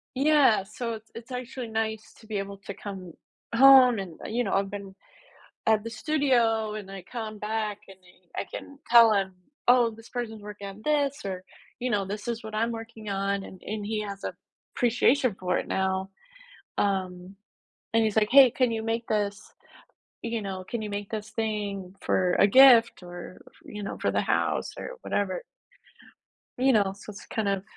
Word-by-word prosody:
yeah, 275 Hz, -7 st, +4 dB
so 230 Hz, +4 st, -5 dB
it's 220 Hz, 0 st, -10 dB
it's 230 Hz, +3 st, -10 dB
actually 250 Hz, -1 st, -5 dB
nice 220 Hz, -1 st, -3 dB
to 220 Hz, -, -17 dB
be 215 Hz, -1 st, -3 dB
able 195 Hz, 0 st, -5 dB
to 200 Hz, -, -5 dB
come 190 Hz, -4 st, -8 dB, 0.4 s
home 255 Hz, -3 st, +8 dB
and, 180 Hz, -4 st, -7 dB
you 240 Hz, +3 st, 0 dB
know, -, -, -1 dB
I've 195 Hz, 0 st, +1 dB
been 200 Hz, -1 st, -7 dB, 0.7 s
at 220 Hz, -1 st, +4 dB
the 230 Hz, -, -5 dB
studio 230 Hz, -5 st, +1 dB
and 205 Hz, -3 st, -7 dB
I 195 Hz, -2 st, -8 dB
come 220 Hz, -3 st, -5 dB
back 215 Hz, -1 st, -2 dB
and 195 Hz, -, -13 dB
then 180 Hz, 0 st, -23 dB
I -, -, -1 dB
can 280 Hz, -, -12 dB
tell 230 Hz, -2 st, +8 dB
him, 195 Hz, -2 st, 0 dB, 0.3 s
"Oh, 245 Hz, -1 st, +6 dB
this 225 Hz, +1 st, -14 dB
person's 225 Hz, -4 st, -5 dB
working 205 Hz, -1 st, -8 dB
on 195 Hz, +2 st, -10 dB
this," 290 Hz, -3 st, +1 dB
or, 185 Hz, -2 st, -4 dB, 0.4 s
you 250 Hz, +1 st, -1 dB
know, 200 Hz, -3 st, +1 dB
"This 205 Hz, +3 st, -6 dB
is 235 Hz, -1 st, -3 dB
what 220 Hz, 0 st, -8 dB
I'm 230 Hz, +2 st, +1 dB
working 225 Hz, -2 st, -8 dB
on," 195 Hz, 0 st, -1 dB
and 185 Hz, -, -11 dB
and 210 Hz, -1 st, -4 dB
he 215 Hz, 0 st, -2 dB
has 200 Hz, -1 st, -6 dB
an -, -, -3 dB, 0.4 s
appreciation 245 Hz, +1 st, +3 dB
for 180 Hz, -1 st, 0 dB
it -, -, -6 dB
now. 190 Hz, 0 st, -1 dB, 0.7 s
Um, 185 Hz, -1 st, -1 dB, 0.6 s
and 225 Hz, 0 st, +4 dB
he's 215 Hz, -1 st, -1 dB
like, 215 Hz, -1 st, +3 dB
"Hey, 270 Hz, -1 st, +8 dB
can 250 Hz, 0 st, +1 dB
you 225 Hz, -1 st, -2 dB
make 225 Hz, +1 st, -2 dB
this," 205 Hz, -1 st, -2 dB, 0.7 s
you 230 Hz, -1 st, -2 dB
know? 190 Hz, -2 st, -5 dB
Can 230 Hz, +4 st, -4 dB
you 215 Hz, -, -4 dB
make 205 Hz, 0 st, -5 dB
this 215 Hz, -1 st, -5 dB
thing 205 Hz, -4 st, -3 dB
for 180 Hz, -1 st, +2 dB
a -, -, +7 dB
gift 235 Hz, -1 st, +7 dB
or, 175 Hz, 0 st, -10 dB
f -, -, -30 dB
you 210 Hz, 0 st, -7 dB
know, 200 Hz, -, -5 dB
for -, -, 0 dB
the -, -, +2 dB
house -, -, 0 dB
or -, -, -6 dB
whatever." 190 Hz, -3 st, -1 dB, 1.2 s
You 260 Hz, +1 st, +4 dB
know, 200 Hz, -3 st, +2 dB
so 205 Hz, -, -10 dB
it's 200 Hz, -, -11 dB
kind 215 Hz, -3 st, -1 dB
of 195 Hz, -1 st, -1 dB
215 Hz, 190 wpm, -27 LUFS, 195-235 Hz, 1.2 s, home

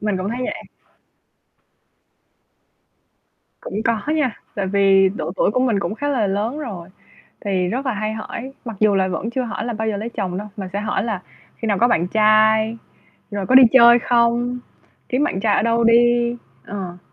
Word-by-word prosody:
Mình 210 Hz, -2 st, -1 dB
cũng 185 Hz, +2 st, -3 dB
thấy 245 Hz, -, -4 dB
vậy. -, -, -5 dB, 3.0 s
Cũng 210 Hz, +3 st, -5 dB
có 230 Hz, -2 st, +1 dB, 0.2 s
nha. 260 Hz, -8 st, -1 dB, 0.2 s
Tại 195 Hz, -2 st, -2 dB
vì 195 Hz, -1 st, +4 dB
độ 165 Hz, -3 st, -4 dB
tuổi 200 Hz, -, +1 dB
của 255 Hz, -, 0 dB
mình 240 Hz, -6 st, +1 dB
cũng 200 Hz, +4 st, -3 dB
khá 290 Hz, -, -3 dB
là 245 Hz, -8 st, +1 dB
lớn 215 Hz, +9 st, -2 dB
rồi, 195 Hz, -, -7 dB, 0.6 s
thì 185 Hz, -2 st, 0 dB
rất 255 Hz, +8 st, -3 dB
là 255 Hz, -, 0 dB
hay 215 Hz, +1 st, -3 dB
hỏi, 235 Hz, +4 st, -7 dB
mặc 230 Hz, -3 st, -6 dB
dù 210 Hz, -2 st, +3 dB
là 190 Hz, -1 st, +2 dB
vẫn 190 Hz, +4 st, -3 dB
chưa 255 Hz, +2 st, -2 dB
hỏi 230 Hz, -2 st, -5 dB
là 240 Hz, -, -3 dB
bao 220 Hz, +1 st, -3 dB
giờ 210 Hz, -, -1 dB
lấy 220 Hz, +3 st, -4 dB
chồng 190 Hz, -5 st, -4 dB
đâu, 210 Hz, -, -6 dB
mà 190 Hz, -2 st, -5 dB
sẽ 200 Hz, -, -1 dB
hỏi 210 Hz, -1 st, -1 dB
là 215 Hz, -6 st, -3 dB, 0.3 s
khi 225 Hz, -, -5 dB
nào 200 Hz, -2 st, +1 dB
có 240 Hz, -, +4 dB
bạn 175 Hz, -7 st, +1 dB
trai, 220 Hz, +2 st, +3 dB, 0.5 s
rồi 200 Hz, -2 st, -3 dB
có 260 Hz, -, +2 dB
đi 260 Hz, -, +10 dB
chơi 240 Hz, -1 st, +7 dB
không, 240 Hz, +1 st, +1 dB, 0.5 s
kiếm 255 Hz, +4 st, +1 dB
bạn 190 Hz, -, -1 dB
trai 205 Hz, 0 st, +2 dB
ở -, -, +2 dB
đâu 230 Hz, 0 st, +1 dB
đi. 240 Hz, +1 st, +3 dB, 0.3 s
Ờ. 185 Hz, -3 st, -6 dB
220 Hz, 195 wpm, -20 LUFS, 200-235 Hz, 3.0 s, đi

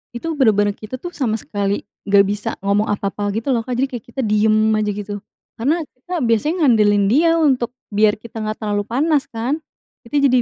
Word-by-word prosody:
itu 235 Hz, -, -6 dB
bener-bener 210 Hz, -8 st, +3 dB
kita 215 Hz, +5 st, -8 dB
tuh, 350 Hz, +7 st, -8 dB
sama 230 Hz, -7 st, -1 dB
sekali 200 Hz, -2 st, -2 dB, 0.2 s
nggak 200 Hz, 0 st, +6 dB
bisa 205 Hz, +1 st, -2 dB, 0.2 s
ngomong 205 Hz, +2 st, +2 dB
apa-apa 205 Hz, 0 st, -2 dB
gitu, 225 Hz, +6 st, -1 dB
lo, 235 Hz, -, +1 dB
Kak. 245 Hz, +1 st, -4 dB
Jadi, 265 Hz, -, +2 dB
kayak 235 Hz, -, -6 dB
kita 265 Hz, +3 st, -3 dB
diem 215 Hz, +1 st, +3 dB
aja, 215 Hz, -1 st, +1 dB
gitu. 205 Hz, 0 st, -5 dB, 0.3 s
Karena, 305 Hz, +8 st, 0 dB
kita 290 Hz, +8 st, -7 dB
biasanya 295 Hz, -, +1 dB
ngandelin 210 Hz, -5 st, +4 dB
dia 330 Hz, +10 st, +4 dB
untuk, 260 Hz, -6 st, +2 dB, 0.2 s
biar 210 Hz, 0 st, +3 dB
kita 225 Hz, 0 st, -8 dB
nggak 215 Hz, 0 st, -3 dB
terlalu 205 Hz, -2 st, -1 dB
panas, 285 Hz, +4 st, +1 dB
kan. 245 Hz, +7 st, -2 dB, 0.4 s
Kita 265 Hz, +5 st, -3 dB
jadi 255 Hz, -3 st, +4 dB
225 Hz, 190 wpm, -19 LUFS, 205-265 Hz, 0.4 s, nggak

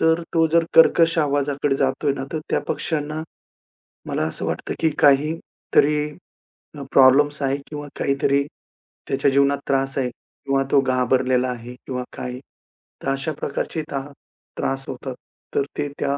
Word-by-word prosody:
तर 160 Hz, +1 st, +3 dB
तो 165 Hz, -1 st, +4 dB
जर 170 Hz, 0 st, +5 dB
कर्कश 165 Hz, 0 st, +6 dB
आवाजाकडे 145 Hz, -1 st, +1 dB
जातोय 140 Hz, +1 st, +1 dB
ना, 135 Hz, -1 st, -4 dB
तर 160 Hz, -, -1 dB
त्या -, -, +2 dB
पक्षांना, 155 Hz, -1 st, -2 dB, 0.9 s
मला -, -, -1 dB
असं -, -, -4 dB
वाटतं, -, -, -3 dB
की 160 Hz, -, +3 dB
काहीतरी 150 Hz, 0 st, +2 dB, 0.7 s
अ, -, -, -6 dB
प्रॉब्लेम्स 145 Hz, +3 st, +5 dB
आहे 135 Hz, 0 st, +1 dB
किंवा 145 Hz, -1 st, -6 dB
काहीतरी 140 Hz, 0 st, +2 dB, 0.6 s
त्याच्या 135 Hz, +1 st, +2 dB
जीवनात 140 Hz, +1 st, +3 dB
त्रास 135 Hz, 0 st, 0 dB
आहे 125 Hz, -2 st, +1 dB
किंवा 135 Hz, +2 st, -3 dB
तो 140 Hz, -, +6 dB
घाबरलेला 130 Hz, 0 st, +2 dB
आहे 125 Hz, 0 st, -6 dB
किंवा 125 Hz, -1 st, -3 dB
काही. 125 Hz, 0 st, -5 dB, 0.6 s
तर -, -, -1 dB
अशा 135 Hz, +3 st, -1 dB
प्रकारची 155 Hz, +3 st, -3 dB
त्रा 135 Hz, -, -2 dB, 0.6 s
त्रास 135 Hz, 0 st, -1 dB
होतात. 130 Hz, 0 st, -5 dB, 0.4 s
तर -, -, +3 dB
ते 145 Hz, -1 st, 0 dB
त्या 140 Hz, 0 st, 0 dB
140 Hz, 145 wpm, -22 LUFS, 135-150 Hz, 0.9 s, कर्कश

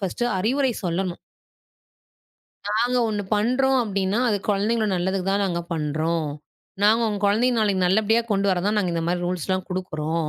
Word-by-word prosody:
First 200 Hz, +5 st, -2 dB
அறிவுரை 255 Hz, +6 st, +1 dB
சொல்லணும். 180 Hz, +1 st, -2 dB, 1.5 s
நாங்க 235 Hz, +4 st, +1 dB
ஒண்ணு 210 Hz, -1 st, -2 dB
பண்றோம் 255 Hz, +5 st, +2 dB
அப்டின்னா, 200 Hz, -1 st, -1 dB
அது 210 Hz, -, +2 dB
குழந்தைங்களோ 215 Hz, +2 st, +1 dB
நல்லதுக்கு 185 Hz, +1 st, -1 dB
தான் 200 Hz, +1 st, +1 dB
நாங்க 175 Hz, -3 st, -1 dB
பண்றோம். 160 Hz, +1 st, -1 dB, 0.6 s
நாங்க 215 Hz, +3 st, +5 dB
உங்க 205 Hz, -2 st, -3 dB
குழந்தைங்க 235 Hz, +5 st, +2 dB
நாளைக்கு 195 Hz, -3 st, +1 dB
நல்லபடியா 220 Hz, +4 st, +3 dB
கொண்டு 200 Hz, 0 st, +1 dB
வரத் 185 Hz, +1 st, 0 dB
தான் 210 Hz, -, +1 dB
நாங்க 185 Hz, -4 st, 0 dB
இந்த 165 Hz, -, -1 dB
மாரி 175 Hz, 0 st, -1 dB
ரூல்ஸ்லாம் 185 Hz, +1 st, -2 dB
குடுக்கிறோம், 165 Hz, -3 st, -2 dB
195 Hz, 150 wpm, -23 LUFS, 180-220 Hz, 1.5 s, நாங்க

